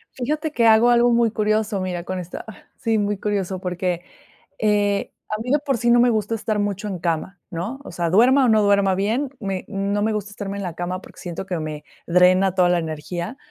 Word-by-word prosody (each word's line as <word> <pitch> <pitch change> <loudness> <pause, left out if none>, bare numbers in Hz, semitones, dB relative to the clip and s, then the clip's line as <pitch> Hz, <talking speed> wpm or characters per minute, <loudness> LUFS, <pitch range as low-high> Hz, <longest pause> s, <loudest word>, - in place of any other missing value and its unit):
Fíjate 300 +5 -2
que 235 -5 +1
hago 225 +2 +6
algo 240 0 +4
muy 235 -1 +3
curioso, 215 -1 0
mira, 180 -2 -3
con 185 +1 -4
esta 180 0 -7
ah, 220 - -9 0.2
sí, 225 -2 0
muy 205 0 0
curioso, 195 -2 -2
porque, 180 -1 -2 0.6
eh, 205 -2 +1 0.2
a 215 - -2
mí 250 - -5
de 290 - +4
por 280 -3 -1
sí, 235 +1 +1
no 240 0 +6
me 245 - +5
gusta 220 0 0
estar 215 -1 -2
mucho 205 0 -2
en 190 -3 -4
cama, 170 +3 -2
¿no?, 200 +10 -4
o - - -9
sea, 170 -1 -1
duerma 255 +8 +5
o 250 - +3
no 215 -1 +4
duerma 200 -1 +3
bien, 225 +9 0
me 195 -3 -3
no 200 0 -1
me 220 +1 +1
gusta 210 -1 -3
estarme 200 -1 -5
en 200 - -4
la 175 -3 -4
cama 180 +1 -4
porque - - -15
siento 175 +2 -6
que 180 -3 -2
me, 155 -1 -5 0.2
drena 180 +2 +4
toda 180 -2 +4
la 175 - +3
energía. 170 - -5
200 Hz, 225 wpm, -22 LUFS, 180-225 Hz, 0.6 s, hago